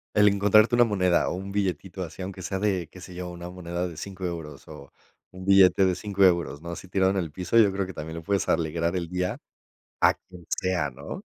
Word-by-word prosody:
El 105 -1 +6
encontrarte 105 +3 +4
una 120 0 +6
moneda 90 -5 +2
o - - -3
un 95 +1 -6
billetito 95 -2 -2
así, 90 +2 -8
aunque 95 0 -7
sea 95 +1 -3
de, 95 -5 0
¿qué 90 - -13
se 90 0 -10
yo?, 90 0 -6
una 85 0 -8
moneda 90 0 -4
de 85 - -9
5€ 95 +3 -6
euros, 75 -5 -6
o 75 -3 -12 0.4
un 95 0 -10
billete 95 0 +6
de 90 - +2
5€ 100 +1 -1
euros, 85 -4 +2
¿no?, 85 - -5
así 95 - -8
tirado 95 +1 +2
en 100 - -2
el 85 -5 -2
piso, 90 +7 -1
yo 100 -3 +5
creo 95 0 -2
que 95 - -8
también 80 +2 -6
le 80 - -7
puedes 100 0 0
alegrar 85 +1 0
el 85 -2 -2
día 90 +1 -2 0.6
a - - +5
quien 90 -2 -15
sea, 90 -6 0
¿no? 70 +3 -8
90 Hz, 230 wpm, -26 LUFS, 85-95 Hz, 0.6 s, El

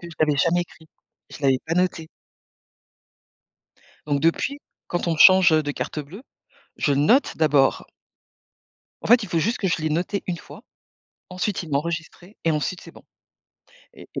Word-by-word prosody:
que 170 - -10
je 165 - -12
l'avais 150 -2 +2
jamais 175 +3 +2
écrit, 160 -2 -17 0.4
je 150 - -12
l'avais 135 -1 +3
pas 165 - -1
noté. 180 -3 -1 2.0
Donc 145 -1 0
depuis, 215 - 0 0.3
quand 175 0 -3
on - - +1
me - - -8
change, 185 -1 +7
heu, 155 0 +3
de 145 - -3
carte 150 - -5
bleue, 170 - -11 0.6
je 145 - +1
note 155 - +3
d'abord. 145 -4 +2 1.2
En - - -5
fait, 240 +1 +5
il 205 - -6
faut 170 - 0
juste 225 +9 0
que 195 - -1
je - - +1
l'ai 155 - -1
noté 180 +5 -2
1 180 - -2
fois, - - -13 0.7
ensuite 185 +1 -3
il 160 - -10
m'a 140 - +2
enregistré 170 +4 -6
et 165 - +2
ensuite, 155 +4 -2
c'est - - -13
bon - - -17 0.9
et - - -14
et - - -4
165 Hz, 180 wpm, -23 LUFS, 150-185 Hz, 2.0 s, change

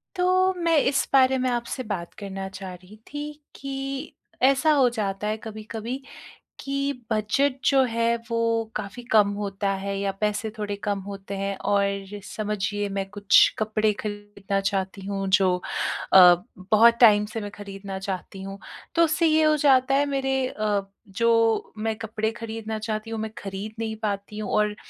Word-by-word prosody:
तो 370 +1 +3
मैं 335 -1 +4
इस 275 0 +1
बारे 265 -1 +5
में 255 0 0
आपसे 240 +2 -2
बात 195 -6 -5
करना 195 -1 -5
चाह 190 -1 -8
रही 180 +3 -14 0.2
थी 295 +1 -4 0.2
कि, 275 0 -5 0.3
ऐसा 275 +4 +4
हो 265 -4 +4
जाता 210 -3 -3
है 215 +1 -1
कभी-कभी 220 +3 -6 0.6
कि 275 0 -1 0.2
बजट 225 +6 +1
जो 275 -1 +5
है 230 0 +1
वो 230 0 0 0.4
काफ़ी 210 +3 -5
कम 210 -2 +6
होता 200 -1 -2
है 200 0 -3
या 200 0 0
पैसे 210 +1 0
थोड़े 205 -1 -3
कम 205 -2 -1
होते 200 0 -7
हैं 195 0 -2 0.2
और 200 -1 +1 0.2
समझिए 205 -1 -2
मैं 195 -1 -1
कुछ 205 0 +3 0.2
कपड़े 215 0 +1
खरीदना 205 -1 -4
चाहती 195 0 -3
हूँ 195 -1 -2
जो 185 -2 +2 0.6
अ, 180 -2 +10 0.4
बहुत 230 +2 +6
टाइम 210 -3 +7
से 225 - -3
मैं 205 0 -6
खरीदना 195 -1 -7
चाहती 190 0 -5
हूँ 195 +1 -7 0.4
तो 335 - +5
उससे 330 +1 +2
ये 315 0 +4
हो 310 0 +4
जाता 270 -2 +4
है 285 +1 +3
मेरे 270 -2 0
अ, 210 -4 -1 0.3
जो 230 +2 +2
मैं 220 +1 -1
कपड़े 220 0 -2
खरीदना 225 -1 -5
चाहती 215 0 -4
हूँ 225 -1 -4
मैं 220 0 -4
खरीद 200 +2 -6
नहीं 220 -1 -2
पाती 200 0 -3
हूँ 210 - -4
और 210 0 +2
215 Hz, 165 wpm, -25 LUFS, 200-255 Hz, 0.6 s, अ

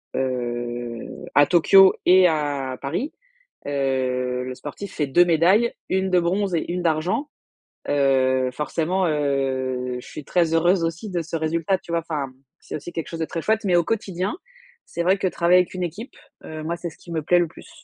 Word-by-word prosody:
heu, 120 -2 -4
à 145 0 +7
Tokyo 190 +3 +6
et 185 0 +7
à 145 -5 -1
Paris. 170 - -3 0.6
Heu, 130 -2 -1
le 130 - -5
sportif 175 +9 -8
fait 150 -2 0
2 175 +6 +5
médailles, 180 +8 +3 0.2
1 190 0 +1
de 180 - +5
bronze 185 +2 0
et 160 - -1
1 180 0 -2
d'argent. 170 - 0 0.6
Heu, 130 -2 +2
forcément, 165 +6 -1
heu, 130 -4 -1
je - - -14
suis 150 - -8
très 170 -2 +1
heureuse 175 +2 +3
aussi 165 +6 -4
de 175 -2 -1
ce 165 +1 -6
résultat, 165 +4 0
tu 170 - -11
vois? 170 - +2
Enfin, 145 -5 -3 0.3
c'est - - -7
aussi 175 +3 -7
quelque 165 - -4
chose 165 - -6
de - - +1
très 165 - -5
chouette 220 +3 +1
mais 180 -2 +3
au 170 - +3
quotidien, 195 - -2 0.5
c'est 170 - -4
vrai 185 +3 +3
que 190 - 0
travailler 180 +1 +4
avec 180 - -1
une 180 -1 -3
équipe, 200 - -6 0.3
heu, 155 0 -7
moi, 170 +2 -2
c'est 175 -1 -5
ce - - -17
qui 175 - -17
me 160 -1 -1
plaît 175 +3 +4
le 170 - +1
plus. - - -15
165 Hz, 195 wpm, -23 LUFS, 135-180 Hz, 0.6 s, à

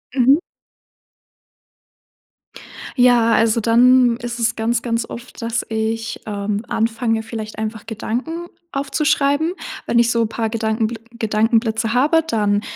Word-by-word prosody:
Mhm. 265 +3 +5 2.6
Ja, 245 -3 +4
also, 225 0 +3
dann 240 +1 +4
ist 240 0 -6
es 230 0 +1
ganz, 230 +1 0
ganz 230 -1 -2
oft, 240 +1 -9
dass 230 0 -2
ich, 225 0 -2
ähm, 205 0 -3
anfange 225 0 0
vielleicht 220 -1 -7
einfach 220 0 -4
Gedanken 250 +10 -4 0.2
aufzuschreiben. 285 +2 +1 0.3
Wenn 235 - +1
ich 235 0 +4
so 230 -1 +1
paar 225 0 -2
Gedankenbl 220 0 -1 0.2
Gedankenblitze 225 +1 +1
habe, 305 +5 +3
dann 210 -6 +1
230 Hz, 120 wpm, -20 LUFS, 220-245 Hz, 2.6 s, Mhm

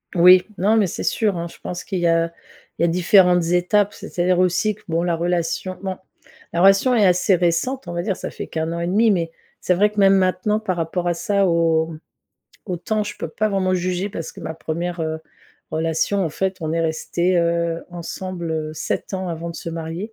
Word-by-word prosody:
Oui, 180 +1 +7
non, 210 +4 +3
mais 205 -4 +3
c'est - - -5
sûr 210 -6 +1
hein, 170 - -3
je - - -15
pense 180 - -5
qu'il 190 -3 -3
y 175 - +2
a 165 0 +2 0.5
il - - +2
y - - +6
a - - +3
différentes 180 0 +4
étapes. 180 +4 +2
C'est-à-dire 180 0 -1
aussi 185 +4 +2
que, - - -22
bon 165 +1 0
la 175 -1 +1
relation 175 +2 -2
bon 190 -1 -4 0.6
la 170 - +1
relation 195 +6 +5
est 210 -4 +4
assez 180 +1 +4
récente, 180 +8 0
on 175 - -5
va 175 - -2
dire, 195 0 -1
ça - - -5
fait - - -7
qu' - - -7
1 160 +1 -2
an 170 - -3
et 170 - -2
demi. 215 +4 +3
Mais 165 -3 0 0.3
c'est 180 - +2
vrai 205 +4 +3
que 210 - -4
même 195 0 +6
maintenant, 185 +3 +1
par 190 -5 -2
rapport 175 +2 -2
à 175 - +2
ça, 200 +2 +1
au 165 -1 +2 0.7
au 180 -3 -2
temps, 215 +5 -1
je 205 -2 -6
peux - - -5
pas 215 +7 -1
vraiment 185 -2 +1
juger, 185 +2 -1
parce 165 -4 -5
que - - -12
ma 160 - -5
1re 170 +2 -4
heu, 160 0 -2 0.5
relation 165 +5 0
en - - 0
fait, 190 +3 -2
on 160 -1 -2
est 165 - 0
restés, 170 +3 0
heu, 170 0 0
ensemble, 175 0 -5
heu, 155 -1 -3
7 190 - -3
ans 190 -1 -3
avant 170 0 -4
de 170 - -8
se 165 - -6
marier. 165 +6 -5
175 Hz, 225 wpm, -21 LUFS, 165-195 Hz, 0.7 s, Oui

